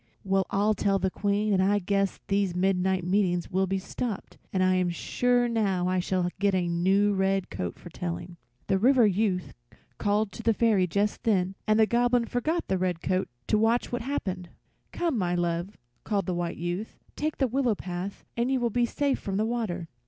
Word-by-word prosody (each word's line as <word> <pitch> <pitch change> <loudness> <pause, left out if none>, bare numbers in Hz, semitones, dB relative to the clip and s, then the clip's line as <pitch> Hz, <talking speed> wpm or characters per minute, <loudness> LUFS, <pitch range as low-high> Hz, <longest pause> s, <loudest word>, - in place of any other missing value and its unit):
Well 195 -1 +1
I'll 205 +2 +2
tell 200 -1 +1
the 190 0 -1
Queen 205 +2 0
and 190 - +3
I 200 +2 +3
guess 195 0 0
these 195 -3 +1
midnight 190 0 +1
meetings 180 -1 +1
will 190 +1 +1
be 195 +1 0
stopped, 205 +2 -5
and 185 -1 +1
I 185 0 +4
am 180 -1 +2
sure 245 +7 +1
now 200 -6 0
I 185 0 +1
shall 180 0 0
get 200 -1 +2
a 180 -2 +1
new 190 +4 +2 0.4
coat 90 -1 -4
for 175 - -12
telling." 175 0 -5 0.3
The 195 -1 +1
River 250 +2 +5
Youth 195 -2 0 0.5
called 205 0 +1
to - - -8
the 225 -1 +2
Fairy 210 -6 +3
just 200 +4 0
then, 190 -4 +1
and 215 +1 +4
the 220 - +7
Goblin 240 +1 +2
forgot 310 +9 -1
the 190 -1 0
red 180 -2 -1
coat 185 0 0 0.2
to 215 - +2
watch 230 +2 +2
what 245 - -2
happened. 190 -9 -3 0.4
"Come, 330 -9 -1
my 175 -2 0
love," 175 +3 -2 0.3
called 200 -4 -1
the 185 - -1
White 175 -1 -3
Youth, 175 +5 -4 0.2
"take 310 +1 -2
the 265 - +2
willow 250 -2 +1
path 185 +1 -6
and 235 +2 0
you 265 -1 +2
will 240 -1 0
be 240 +2 +2
safe 280 +2 0
from 195 -1 -3
the 215 - +1
water." 215 -8 -2
195 Hz, 195 wpm, -27 LUFS, 180-225 Hz, 0.5 s, the